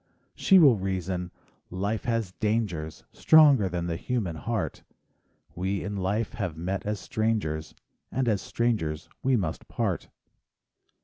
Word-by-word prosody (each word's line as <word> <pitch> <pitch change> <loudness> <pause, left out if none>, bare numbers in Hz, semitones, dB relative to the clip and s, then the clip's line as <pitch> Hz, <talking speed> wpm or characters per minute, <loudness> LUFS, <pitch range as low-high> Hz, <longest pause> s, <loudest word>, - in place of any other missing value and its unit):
She 195 - +5
will 140 -10 +7
reason: 95 -2 -2 0.4
"Life 100 +4 -2
has 115 -5 -1
dangers, 105 -8 -1
Stronger 145 -10 +6
than 85 -1 -2
the 85 -1 -2
human 110 -9 -2
heart; 105 +7 -3 0.7
We 95 +2 -2
in 100 +2 -4
life 100 +3 -1
have 90 -8 -3
met 95 +4 -3
as 105 -1 -1
strangers, 105 -10 -2 0.4
And 130 -1 0
as 105 -5 +2
strangers 95 -11 -1
we 130 0 +2
must 85 -6 -3
part." - - -2
100 Hz, 130 wpm, -27 LUFS, 90-115 Hz, 0.7 s, will